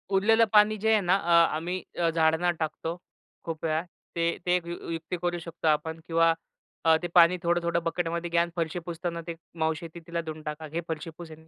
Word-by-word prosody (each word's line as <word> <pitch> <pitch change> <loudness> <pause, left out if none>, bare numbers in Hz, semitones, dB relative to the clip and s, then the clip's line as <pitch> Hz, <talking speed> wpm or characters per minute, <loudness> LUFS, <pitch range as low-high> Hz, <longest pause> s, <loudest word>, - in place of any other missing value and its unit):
उरलेलं 225 +3 +5
पाणी 210 +1 +6
जे 220 +2 +1
आहे 215 -2 +4
ना, 180 +1 +3
अ, 170 -4 +4
आम्ही 180 +3 -3 0.2
अ, 170 -1 +3
झाडांना 160 +2 +2
टाकतो 165 +2 -3 0.5
खूप 165 -1 -5
वेळा. 160 0 +1 0.3
ते 170 0 +1
ते 180 - +1
ए - - +5
एक 170 - -7
यु 170 - -3 0.2
युक्ती 165 +2 -4
करू 175 0 -1
शकतो 165 -1 -5
आपण. 160 +2 +1
किंवा 165 0 +4 0.5
अ, 160 0 +7
ते - - 0
पाणी 175 0 +7
थोडं-थोडं 170 0 +1
बकेटमध्ये 170 0 -2
घ्या 170 0 +3
आणि 170 0 -2
फरशी 165 +1 -2
पुसताना 170 0 -4
ते 170 - -3 0.3
मावशी 160 +1 0
येतील 165 +1 -10
तिला 170 0 -2
देऊन 155 -1 -7
टाका, 150 +1 -5
"घे, 165 +3 -3
फरशी 160 0 -4
पुस 170 -1 -8
ह्यानी." - - -9
170 Hz, 215 wpm, -27 LUFS, 160-175 Hz, 0.5 s, अ